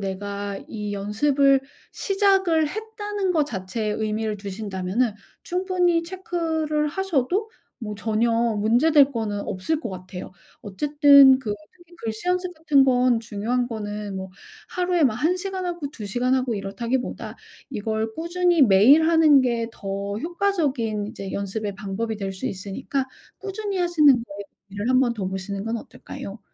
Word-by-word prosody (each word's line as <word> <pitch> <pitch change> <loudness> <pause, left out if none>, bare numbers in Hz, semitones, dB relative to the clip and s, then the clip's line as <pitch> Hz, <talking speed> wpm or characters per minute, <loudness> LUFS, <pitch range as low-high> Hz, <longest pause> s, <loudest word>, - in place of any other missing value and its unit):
내가 200 +1 -4
이 210 -2 -5
연습을 270 +7 +2 0.3
시작을 385 -6 +2
했다.'는 415 -1 -3
거 310 -4 +2
자체에 215 -3 -4
의미를 215 0 -2
두신다면은 200 +2 -2 0.3
충분히 360 -2 +1
체크를 325 -4 -2
하셔도 385 - -1 0.3
뭐 210 -2 -5
전혀 220 +2 0
문제될 235 +6 +3
거는 215 -3 -2
없을 250 +13 -2
것 235 - -4
같아요. 185 0 -8 0.3
어쨌든 280 +4 +6
그 215 -5 -3 0.2
특히 345 0 -19
글씨 225 +8 -4
연습 360 0 0
같은 300 -4 +4
건 250 -2 +3
중요한 235 +3 -2
거는 210 -3 -5
뭐 190 0 -5 0.4
하루에 355 -3 +1
막 245 -5 +3
1 325 +9 +1
시간 380 0 -4
하고 345 -5 -4
2 220 - -9
시간 250 +5 +1
하고 255 -3 0
이렇다기보다 230 +6 -3 0.3
이걸 220 -1 -2
꾸준히 345 0 +1
매일 250 +9 +6
하는 315 -4 +6
게 235 -2 0
더 200 0 -4
효과적인 295 - -1
이제 200 -4 -7
연습의 200 +1 -3
방법이 210 +3 -3
될 195 -2 -4
수 185 - -5
있으니까 205 +8 -3 0.3
꾸준히 400 0 -4
하시는 335 -6 +5
거에 200 -3 -11 0.3
의미를 205 +5 -2
한번 255 -2 +3
둬 200 -4 -3
보시는 195 +1 -5
건 225 +1 -2
어떨까요? 205 -1 -9
245 Hz, 305 characters per minute, -24 LUFS, 205-320 Hz, 0.4 s, 어쨌든